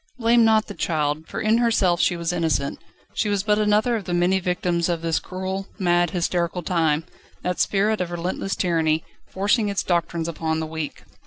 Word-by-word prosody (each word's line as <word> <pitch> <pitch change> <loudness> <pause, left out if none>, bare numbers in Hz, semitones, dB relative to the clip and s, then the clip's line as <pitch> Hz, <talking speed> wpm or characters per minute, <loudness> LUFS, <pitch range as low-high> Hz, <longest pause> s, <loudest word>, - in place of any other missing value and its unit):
Blame 235 -1 +4
not 220 -1 +4
the 205 - -8
child, 155 -3 -1
for - - -5
in 220 +2 +2
herself 200 -7 +2
she 175 - +2
was 170 +1 -2
innocent. 160 -5 -1 0.3
She 215 - 0
was 200 -2 0
but 210 0 +2
another 215 +3 +2
of 210 -4 -4
the 175 - -1
many 180 +2 +2
victims 180 -1 0
of 170 -1 -2
this 165 -1 +1
cruel, 190 +1 -5
mad, 175 -3 +2
hysterical 175 0 -1
time, 160 -3 +1 0.4
that 180 0 -2
spirit 210 +1 +1
of 180 - -2
relentless 175 +3 -3
tyranny, 160 -3 +1 0.3
forcing 205 +3 +1
its 200 - -1
doctrines 170 -2 -1
upon 160 -1 -2
the 160 - -2
weak. 155 -1 -6
180 Hz, 185 wpm, -23 LUFS, 165-205 Hz, 0.4 s, Blame